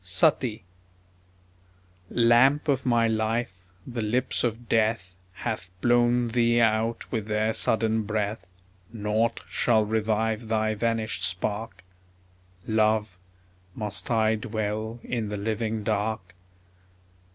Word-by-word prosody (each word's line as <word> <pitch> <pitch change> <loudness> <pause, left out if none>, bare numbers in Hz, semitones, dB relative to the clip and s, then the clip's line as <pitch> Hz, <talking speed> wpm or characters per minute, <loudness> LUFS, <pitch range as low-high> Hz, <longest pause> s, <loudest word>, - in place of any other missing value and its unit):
SUTTEE 105 +5 +1 1.5
Lamp 120 +6 +4
of 135 -3 +1
my 115 -2 +3
life, 110 -4 -2 0.2
the 120 -2 -4
lips 120 +4 0
of 120 0 -2
Death 110 -5 +1 0.2
Hath 90 - -4
blown 120 +1 +3
thee 120 0 +3
out 115 0 +1
with 110 -4 -2
their 110 +1 +1
sudden 110 0 +1
breath; 105 -3 -3 0.4
Naught 110 +1 0
shall 110 -3 +2
revive 110 +1 0
thy 110 -1 +1
vanished 115 0 -1
spark... 100 +3 -3 0.8
Love, 110 -3 +1 0.6
must 105 -1 -5
I 110 -2 +3
dwell 110 0 -3
in 115 -4 -3
the 105 - -3
living 110 +1 -2
dark? 105 -3 -2
110 Hz, 105 wpm, -26 LUFS, 105-115 Hz, 1.5 s, Lamp